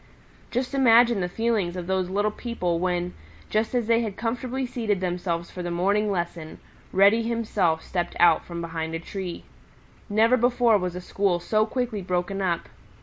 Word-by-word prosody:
Just 250 +3 -2
imagine 240 -4 +5
the 180 -1 -1
feelings 210 -4 0
of 180 -1 -4
these 185 0 -1
little 205 +2 +1
people 180 -8 -2
when, 180 0 -1 0.4
just 215 +3 0
as 240 -2 +1
they 230 +1 +3
had 215 -4 -4
comfortably 250 +3 -2
seated 225 -5 -1
themselves 175 -2 -2
for 180 - -6
the 175 - -3
morning 200 +5 +1
lesson, 170 -4 -3 0.3
Reddy 200 +4 +5
himself 215 -8 0
stepped 175 -2 -3
out 170 -2 +5
from 170 -1 -6
behind 165 -1 -4
a - - -3
tree. 180 +1 -6 0.7
Never 225 +4 +4
before 240 -2 +3
was 180 -1 -3
a 180 - -5
school 190 -1 0
so 215 +5 +1
quickly 240 -3 -2
broken 185 +2 -2
up. 175 -3 -1
195 Hz, 170 wpm, -25 LUFS, 175-230 Hz, 0.7 s, imagine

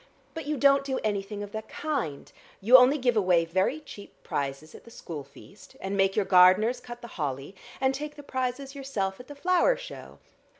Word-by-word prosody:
But 320 -3 -7
you 300 -1 -1
don't 275 +1 +4
do 265 -1 -2
anything 205 -1 -3
of 205 - -9
that 220 0 -7
kind: 270 - -4 0.3
you 230 +6 +5
only 260 +3 +7
give 245 -3 +1
away 180 -5 +3
very 190 - 0
cheap 205 -9 -12
prizes 140 +2 -4
at - - -13
the - - -15
school 160 -9 -8
feast, 195 - -17
and 195 +1 -4
make 195 0 +2
your 210 - +1
gardeners 185 +6 +5
cut 240 0 -10
the - - -7
holly, 135 +4 -3 0.3
and 265 0 +2
take 295 +2 -6
the 290 - -11
prizes 260 0 -3
yourself 220 -9 -3
at 250 - -12
the 290 - -10
flower 365 - +2
show. - - -10
235 Hz, 200 wpm, -27 LUFS, 190-275 Hz, 0.3 s, only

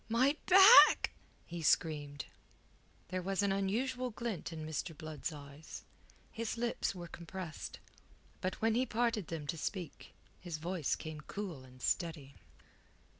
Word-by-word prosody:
"My 255 +6 +3
back!" 390 +5 +9 0.3
he 170 0 -6
screamed. 145 -2 +1 0.8
There 185 0 -2
was 195 +2 -1
an 200 - +2
unusual 245 +7 -1
glint 225 -7 -4
in 160 -1 -6
Mr. 155 0 -4
Blood's 155 +1 -5
eyes; 145 +1 -10 0.5
his 230 +1 -4
lips 235 -4 -1
were 175 -1 -7
compressed. 170 -1 -7 0.6
But 185 - -1
when 225 0 +4
he 255 +3 +1
parted 225 -4 0
them 160 -3 -5
to 155 +3 -3
speak, 180 0 -5 0.2
his 175 -3 -5
voice 170 -1 -1
came 155 -2 -7
cool 175 -5 -6
and 130 -1 -15
steady. 155 -5 -1
175 Hz, 135 wpm, -34 LUFS, 155-220 Hz, 0.8 s, back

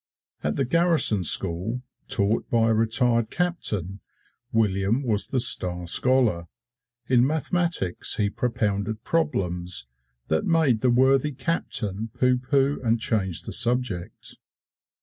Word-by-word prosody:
At - - -1
the 135 - 0
garrison 165 - +3
school, 95 +8 +1 0.2
taught 105 +1 0
by 115 -1 +2
a - - +3
retired 115 +1 +1
captain, 105 - -2 0.5
William 105 +3 0
was 110 -5 -1
the 130 - -1
star 90 -7 +2
scholar. 110 -3 +2 0.6
In 125 0 +3
mathematics 160 - -1
he 105 - 0
propounded 110 -3 -2
problems 90 - -1 0.4
that 80 0 0
made 155 -9 +1
the 130 - +2
worthy 135 +4 +3
captain 115 - -3
pooh 125 0 +2
pooh 135 +2 0
and 115 -1 +1
change 95 -6 0
the - - -6
subject. 120 -8 -2
115 Hz, 120 wpm, -24 LUFS, 100-130 Hz, 0.6 s, garrison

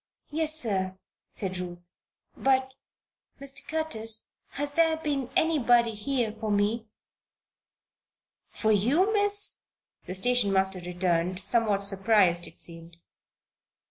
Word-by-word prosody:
"Yes, 310 0 +2
sir," 190 -6 0 0.3
said 185 -2 -6
Ruth. 175 -1 -6 0.6
"But 265 -1 0 0.3
" - - -45
"Mr. 275 0 -1
Curtis, 225 -9 -1 0.2
has 290 +1 -4
there 325 +1 +2
been 285 -5 -3
anybody 245 -7 +2
here 230 +1 -2
for 220 -1 -4
me?" 210 +3 -1 1.6
"For 220 - -1
you, 280 - +2
Miss?" 410 -1 +4 0.4
the 185 - -2
station 245 +1 +3
master 190 -1 +3
returned, 180 0 -2
somewhat 205 -1 +2
surprised 195 -3 +2
it - - -6
seemed. 165 0 -5
220 Hz, 110 wpm, -26 LUFS, 190-275 Hz, 1.6 s, Miss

